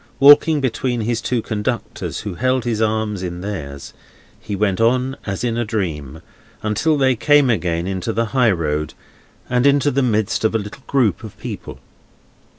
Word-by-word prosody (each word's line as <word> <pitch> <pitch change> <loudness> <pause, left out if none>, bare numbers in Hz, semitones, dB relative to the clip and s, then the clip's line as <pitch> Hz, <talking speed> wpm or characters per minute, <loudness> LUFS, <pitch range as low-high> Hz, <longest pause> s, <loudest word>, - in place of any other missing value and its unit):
Walking 145 +2 +7
between 125 -1 -1
his 115 +1 -1
two 120 -3 -1
conductors, 110 +3 -3
who 105 - -5
held 130 +5 0
his 115 -2 -1
arms 110 -2 0
in 90 -1 -5
theirs, 75 -9 -6 0.5
he 105 - -5
went 100 0 0
on, 130 +3 +2
as 100 +1 -3
in 120 -1 0
a - - +1
dream, 80 - -4 0.4
until 145 +9 +1
they 130 -2 +3
came 145 +2 +4
again 85 -4 -1
into 95 +3 -2
the 115 +1 0
high 125 -3 +4
road, 75 -5 -1 0.5
and 125 +2 +2
into 140 0 +3
the 140 - +1
midst 110 -5 0
of 110 0 +1
a - - +5
little 105 +6 -8
group 120 -9 +1
of 110 - -10
people. - - -7
110 Hz, 170 wpm, -20 LUFS, 100-130 Hz, 0.5 s, Walking